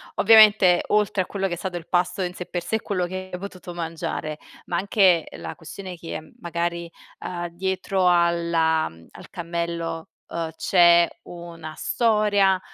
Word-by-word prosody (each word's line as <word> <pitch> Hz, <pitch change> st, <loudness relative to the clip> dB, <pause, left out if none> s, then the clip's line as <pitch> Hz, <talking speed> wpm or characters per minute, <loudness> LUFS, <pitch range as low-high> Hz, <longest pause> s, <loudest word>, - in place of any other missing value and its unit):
Ovviamente, 210 Hz, -4 st, +6 dB
oltre 210 Hz, -2 st, +2 dB
a -, -, -12 dB
quello 195 Hz, -1 st, -2 dB
che 180 Hz, -, -4 dB
è -, -, -4 dB
stato 180 Hz, 0 st, -4 dB
il 170 Hz, -, -10 dB
pasto 180 Hz, +1 st, 0 dB
in 180 Hz, 0 st, -3 dB
sé 180 Hz, -, -7 dB
per 175 Hz, -1 st, -4 dB
sé 175 Hz, +5 st, -2 dB
e 220 Hz, -, -1 dB
quello 185 Hz, -3 st, -1 dB
che 185 Hz, +1 st, -6 dB
hai 180 Hz, -, -4 dB
potuto 185 Hz, -2 st, -8 dB
mangiare 160 Hz, -2 st, -4 dB, 0.3 s
ma 175 Hz, -, -2 dB
anche 190 Hz, -4 st, +3 dB
la 80 Hz, -1 st, -7 dB
questione 190 Hz, -2 st, -9 dB
che 165 Hz, -2 st, -8 dB
magari, 170 Hz, 0 st, -3 dB, 0.3 s
ehm, 175 Hz, -1 st, -5 dB
dietro 190 Hz, +1 st, -1 dB
alla 170 Hz, -2 st, +2 dB
al 80 Hz, 0 st, -12 dB
cammello, 170 Hz, -2 st, -4 dB, 0.2 s
uhm, 165 Hz, -1 st, -3 dB
c'è 170 Hz, -1 st, +5 dB, 0.2 s
una 170 Hz, -2 st, -9 dB
storia, 210 Hz, -4 st, +2 dB
175 Hz, 160 wpm, -23 LUFS, 170-190 Hz, 0.3 s, Ovviamente